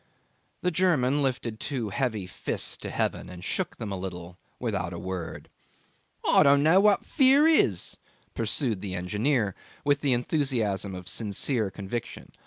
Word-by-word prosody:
The 180 - +2
German 150 -6 +2
lifted 120 -5 -2
two 125 -7 -3
heavy 110 -3 -1
fists 90 - -2
to - - -6
heaven - - -2
and 90 -1 -10
shook - - -2
them 105 -3 -5
a - - -2
little 90 -1 -7 0.2
without 100 -8 -2
a - - -5
word. 90 -3 -5 0.8
'I - - +6
don't 140 0 +5
know 165 +5 +6
what 205 0 +4
fear 275 +1 +5
is,' 125 - +3 0.4
pursued 115 -2 -1
the 95 -3 -4
engineer, 105 +4 0 0.3
with 145 0 +2
the 140 -3 +2
enthusiasm 120 - 0
of 90 -1 -9
sincere 110 +2 0
conviction. 100 +4 -6
115 Hz, 150 wpm, -27 LUFS, 95-145 Hz, 0.8 s, I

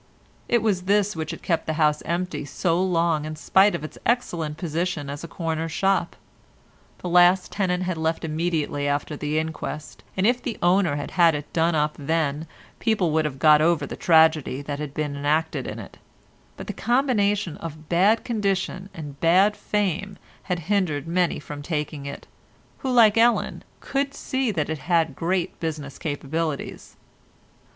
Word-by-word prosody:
It 235 -2 +3
was 190 -5 0
this 205 0 +2
which 160 -1 -4
had 165 - -7
kept 165 -3 0
the 160 - 0
house 150 -1 +2
empty 175 -1 -2
so 170 +4 0
long 170 -4 +1
in 155 0 -5
spite 190 +6 +4
of - - -5
its 155 - -8
excellent 170 -11 -1
position 160 -3 -2
as 145 +2 -7
a - - -5
corner 165 -1 -3
shop. 195 +4 0 0.9
The - - -3
last 180 +1 +4
tenant 185 -2 0
had 180 -2 -2
left 160 +1 -1
immediately 155 -3 -1
after 145 +2 -1
the 150 +1 -2
inquest, 160 -1 -5
and 190 - +2
if 245 +2 +3
the 240 - -4
owner 175 -3 +3
had 145 - -5
had 170 -3 +4
it 150 0 -7
done 165 0 +2
up 150 0 +1
then 155 +1 -1 0.3
people 210 -7 +1
would 160 0 +2
have 140 -3 -3
got 150 +2 +6
over 165 0 +2
the - - -6
tragedy 160 -5 +3
that 145 0 -4
had 150 -2 -6
been 150 -2 -2
enacted 150 +3 0
in - - -5
it, - - -10 0.6
but - - -7
the - - -5
combination 210 - +1
of 155 -2 -8
bad 195 +7 +3
condition 195 -3 -2
and 145 -3 -8
bad 190 +5 +4
fame 200 -2 -2 0.3
had 180 -2 0
hindered 170 -6 0
many 175 +1 +1
from 145 -1 -8
taking 150 -2 -4
it, 140 - -7 0.5
who 265 - -2
like 225 -3 +6
Ellen, 235 +1 +2 0.2
could 275 0 -2
see 260 -2 -1
that 160 -8 -1
it 155 - -3
had 165 -2 +1
great 175 +3 -1
business 150 -4 -5
capabilities. 155 0 -4
165 Hz, 170 wpm, -24 LUFS, 150-190 Hz, 0.9 s, got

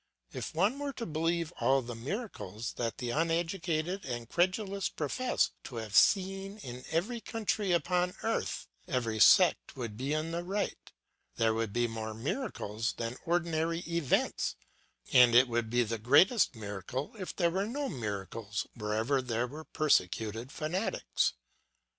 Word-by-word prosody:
If - - -5
one 205 - +2
were 285 -1 -3
to 235 - -5
believe 165 +1 -1
all 135 0 +3
the 120 +1 -6
miracles 115 - -5
that 115 -2 -2
the 125 -1 -3
uneducated 165 +3 0
and 120 -2 -4
credulous 190 - 0
profess 245 - 0
to 125 - -8
have 110 -3 -5
seen 195 +1 +3
in 125 - -8
every 220 +9 -1
country 215 -4 -1
upon 180 +1 +1
earth, 225 - -1 0.2
every 115 -4 -1
sect - - +6
would 115 -5 -5
be 135 +4 -2
in 155 +2 -1
the 170 +1 -2
right; 200 +3 -3 0.4
there 115 -1 +2
would 110 -2 -1
be 120 +3 +1
more 110 -1 -5
miracles 120 - -2
than 115 +1 -4
ordinary 165 -1 +1
events; 170 -5 0 0.6
and 125 -2 +7
it 130 +2 +8
would 120 -2 -1
be 120 +1 +3
the 115 0 -3
greatest 145 - +5
miracle 110 - -5
if 185 - -5
there 170 -2 +2
were 195 +3 0
no 280 +5 -2
miracles 105 - -4
wherever 110 +5 0
there 120 -1 -1
were 150 +5 -8
persecuted 115 - +1
fanatics. 170 +7 -1
150 Hz, 145 wpm, -31 LUFS, 115-180 Hz, 0.6 s, it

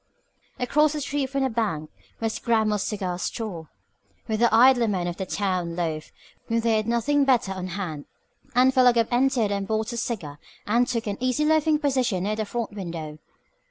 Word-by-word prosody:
Across 300 +4 +2
the 300 - -3
street 275 -1 -2
from 275 0 -1
the 265 - +1
bank 200 -10 -2 0.3
was 225 -1 -2
Grammill's 220 -3 +1
Cigar 185 -5 -3
Store, 180 -6 -4 0.6
where 220 -2 -1
the 235 0 +4
idler 240 +1 +6
men 185 -4 -1
of 175 -1 -4
the 190 - -4
town 180 -4 -1
loafed 160 -3 -3 0.4
when 230 0 +1
they 225 -1 +2
had 215 0 -2
nothing 235 +5 +2
better 250 -7 +2
on 185 -1 -4
hand, 170 -6 -5 0.5
and 255 +1 +5
Philo 250 -2 +5
Gubb 230 -1 +1
entered 245 -4 +2
and 200 -1 -2
bought 220 +2 -1
a - - -4
cigar 165 -12 -4 0.3
and 235 +4 +2
took 240 -2 -2
an 205 -2 -3
easy 255 +4 +1
loafing 310 0 +3
position 260 - 0
near 210 +2 -1
the 215 0 -2
front 230 +1 -4
window. 165 -6 -6
220 Hz, 190 wpm, -25 LUFS, 190-250 Hz, 0.6 s, idler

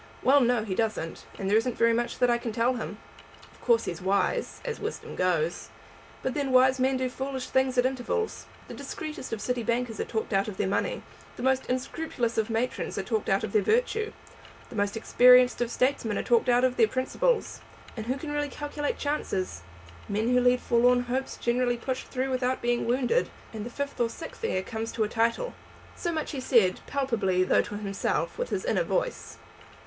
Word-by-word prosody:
"Well, 280 +2 +6
no; 240 -2 +2
he 205 -3 -3
doesn't; 215 -6 -2
and 195 - -3
there 205 +2 +4
isn't 245 +1 -3
very 230 0 +4
much 240 +1 -1
that 250 - +3
I 235 - +2
can 235 -1 -4
tell 235 +3 +2
him. 220 -4 -5 0.5
Of - - -21
course 235 -2 +3
he's 170 -1 -4
wise, 195 +2 0
as 475 -2 -3
wisdom 435 +2 -5
goes. 175 -2 0 0.5
But 260 - -1
then, 280 -3 -1
wise 260 +1 +5
men 260 +1 +2
do 260 - -2
do 255 - 0
foolish 265 0 -4
things 260 -1 +2
at 245 - +4
intervals. 265 - -2 0.2
The - - -8
discreetest 305 -5 -6
of 225 - -2
city 250 +2 -1
bankers 235 -1 -1
are - - +1
talked 220 -1 -3
out 195 +2 +2
of 205 -3 -6
their 205 - 0
money; 195 - -1 0.3
the - - -7
most 265 0 +1
scrupulous 250 -5 -2
of 220 +1 0
matrons 230 +3 -2
are 195 - -1
talked 220 +1 -1
out 195 0 +2
of 215 - -3
their 215 - +3
virtue; 440 - +1 0.6
the - - -8
most 205 +1 0
experienced 250 +2 +6
of 240 - +1
statesmen 240 -3 0
are - - -1
talked 235 0 +3
out 245 +1 +4
of 255 -1 +2
their 225 - +5
principles. 445 - 0 0.3
And 220 -1 -6
who 260 +2 0
can 295 +1 -6
really 290 0 -1
calculate 295 +1 -3
chances? 195 - -2 0.5
Men 215 +3 0
who 250 0 +4
lead 250 0 +3
forlorn 245 +1 +4
hopes 255 +2 -3
generally 245 0 +1
push 255 +2 -3
through 265 0 -2
without 255 0 0
being 240 0 0
wounded; 255 - +2 0.2
and 215 -2 -5
the 235 - -5
fifth 280 +1 -4
or 235 - +2
sixth 325 - -9
heir 190 - 0
comes 225 +2 -4
to 225 - +1
a - - 0
title." 230 - 0 0.4
So 345 - -2
much 315 -2 -3
he 280 - -4
said, 230 -8 +3
palpably, 225 -10 +1
though - - +4
to 205 - -7
himself, 205 - -2
with - - -2
his - - -2
inner - - +2
voice. - - -2
245 Hz, 205 wpm, -28 LUFS, 220-265 Hz, 0.6 s, Well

